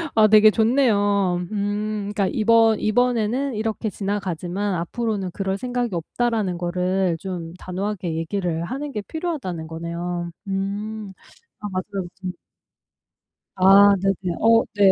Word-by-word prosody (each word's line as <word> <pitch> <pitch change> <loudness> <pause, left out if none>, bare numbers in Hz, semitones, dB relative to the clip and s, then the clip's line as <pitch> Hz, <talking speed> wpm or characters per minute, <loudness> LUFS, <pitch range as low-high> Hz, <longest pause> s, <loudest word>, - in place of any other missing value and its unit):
아 215 -1 +6
되게 215 0 +7
좋네요. 205 -6 +2
음. 205 0 -2
그러니까 200 -2 +1
이번 225 0 +4
'이번에는 245 +3 +1
이렇게 220 0 -2
지나가지만 195 -1 -2
앞으로는 195 +2 -2
그럴 195 +1 -2
생각이 245 -1 -2
없다.'라는 210 +2 -1
거를 180 0 0
좀 170 -2 -6
단호하게 185 -2 -3
얘기를 165 0 -2
하는 275 +10 -4
게 210 - -3
필요하다는 260 - -4
거네요. 170 +1 -4 0.2
음. 200 +2 -3 0.5
아 210 - -5
맞아요. 190 0 -4
좀. 185 -1 -3 1.2
아. 195 +2 +7
네네. 190 -2 -1
어 230 0 +5
네. 200 -2 +6
200 Hz, 280 characters per minute, -23 LUFS, 180-220 Hz, 1.2 s, 되게